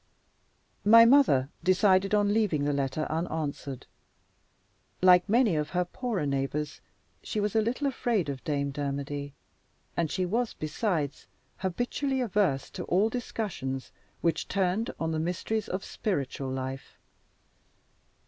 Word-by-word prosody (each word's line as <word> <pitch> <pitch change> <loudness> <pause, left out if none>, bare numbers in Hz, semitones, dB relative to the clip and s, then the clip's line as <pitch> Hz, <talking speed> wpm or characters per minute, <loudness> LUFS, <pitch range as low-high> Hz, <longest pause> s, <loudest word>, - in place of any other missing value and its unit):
My 230 +2 +8
mother 230 - +5
decided 190 +2 +4
on 205 0 +3
leaving 205 -10 +1
the 145 - +1
letter 140 +2 -1
unanswered. 155 -5 -3 1.1
Like 180 +1 +6
many 225 -4 +4
of 150 -1 -1
her 180 0 0
poorer 215 - -3
neighbors, 140 +2 -2 0.4
she 215 - -3
was 210 +1 -1
a 220 - +5
little 240 +6 -1
afraid 235 - 0
of 140 -2 -5
Dame 140 -3 -1
Dermody; 140 0 -4 0.6
and 165 -2 0
she 185 +3 -1
was, 230 +6 -1
besides, 155 - -2 0.3
habitually 245 +8 -1
averse 195 - 0
to - - -5
all 200 +5 +2
discussions 190 - -4 0.3
which 165 -2 0
turned 195 +3 0
on 165 0 -1
the 160 - -1
mysteries 180 +6 -2
of 185 +1 -3
spiritual 140 -8 -3
life. 130 +1 -5
180 Hz, 130 wpm, -28 LUFS, 145-215 Hz, 1.1 s, My